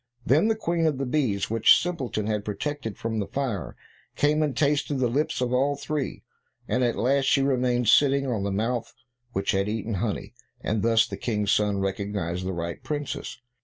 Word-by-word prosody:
Then 150 - +4
the 225 - +2
Queen 170 -6 0
of 150 -4 0
the 135 - -2
bees, 125 -9 0
which 115 -1 +6
Simpleton 135 -12 -3
had 105 -1 -1
protected 110 +2 -4
from 110 -1 -2
the 100 - -2
fire, 115 - -3 0.4
came 150 +1 +2
and 150 -3 -1
tasted 145 0 +1
the 130 -2 +1
lips 135 +3 -1
of 125 0 0
all 140 +3 +2
three, 140 0 -4 0.4
and 125 - +1
at 120 -1 +1
last 135 +3 +2
she 135 +1 +3
remained 125 -3 +1
sitting 140 +3 +5
on 120 -6 -1
the 100 0 -1
mouth 115 +4 -2 0.4
which 95 +1 0
had 100 +1 0
eaten 110 +1 -3
honey, 100 +2 -3 0.3
and 110 -1 -1
thus 115 0 +4
the - - -7
King's 105 -4 -1
son 105 -1 +2
recognized 95 -2 -2
the - - -1
right 85 -1 -5
princess. 145 -2 -4
120 Hz, 190 wpm, -26 LUFS, 105-140 Hz, 0.4 s, which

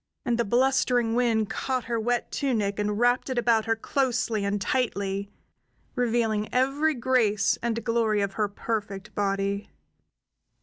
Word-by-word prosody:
And 240 -2 0
the - - +3
blustering 245 0 +2
wind 230 -3 +1
caught 255 -2 -2
her 230 +1 -2
wet 240 +2 -1
tunic 215 -8 -1
and 210 0 -1
wrapped 245 +3 +2
it 260 - -2
about 230 -2 +3
her 225 0 +1
closely 245 -3 -1
and 200 +1 0
tightly, 200 -4 -1 0.6
revealing 225 -4 0
every 280 +5 +2
grace 230 -5 +2
and 230 -1 -2
glory 225 -3 +1
of 200 -1 -1
her 210 +1 0
perfect 205 -1 -4
body. 200 0 -1
225 Hz, 140 wpm, -26 LUFS, 205-245 Hz, 0.6 s, the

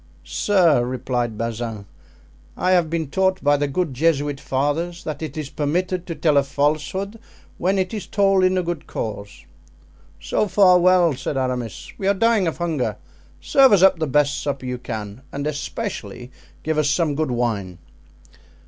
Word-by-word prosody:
"Sir," 150 - +3
replied 120 -2 -2
Bazin, 115 -2 -4 0.7
"I 185 - +1
have 175 -3 +3
been 165 -2 -2
taught 190 0 +1
by 145 0 +4
the 145 0 0
good 155 +1 -2
Jesuit 145 0 +1
fathers 150 +7 -2
that 155 -1 -5
it 155 -2 -6
is 150 -3 -5
permitted 180 +4 -1
to 165 - -4
tell 155 -3 +2
a 140 - +5
falsehood 155 +9 -1 0.4
when 190 +3 +1
it 190 +2 -1
is 210 -4 -5
told 195 -2 +3
in 185 0 +3
a 180 - +1
good 170 -3 -4
cause." 100 -2 -6 0.7
"So 210 - 0
far 185 -1 +5
well," 180 -2 +4
said 135 +2 -4
Aramis; 125 -4 -3
"we 195 - -1
are 200 - +3
dying 225 -2 +2
of 165 - -2
hunger. 165 -7 -2 0.4
Serve 270 -4 +5
us 190 -2 +5
up 190 -3 +5
the 155 - 0
best 145 +1 +1
supper 140 -2 -3
you 125 -1 -4
can, 110 -1 -6
and 140 +1 -4
especially 130 -4 -5 0.3
give 155 -1 0
us 150 -2 +2
some 150 +1 +1
good 155 0 -1
wine." 110 -7 -2
150 Hz, 170 wpm, -22 LUFS, 130-180 Hz, 0.7 s, a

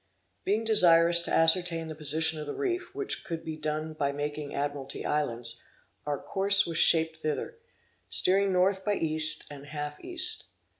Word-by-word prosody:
Being 210 +3 0
desirous 170 -5 +6
to - - -4
ascertain 165 0 +2
the 160 - -7
position 155 +1 0
of 150 - -7
the - - -6
reef, 360 -1 -3
which 410 -2 -3
could 165 -2 -7
be 160 -1 -5
done 155 0 -4
by 140 -2 -2
making 145 +1 -5
the - - -9
Admiralty 140 -1 -5
Islands, 120 -6 -1 0.4
our 145 -1 -2
course 195 +1 +3
was 165 -1 -2
shaped 160 -1 +3
thither, 155 - -4 0.5
steering 195 +1 +1
north 190 +1 +1
by 205 0 -1
east 155 -2 +4
and 140 0 -11
half 150 0 -6
east. 360 0 -2
160 Hz, 165 wpm, -27 LUFS, 150-185 Hz, 0.5 s, desirous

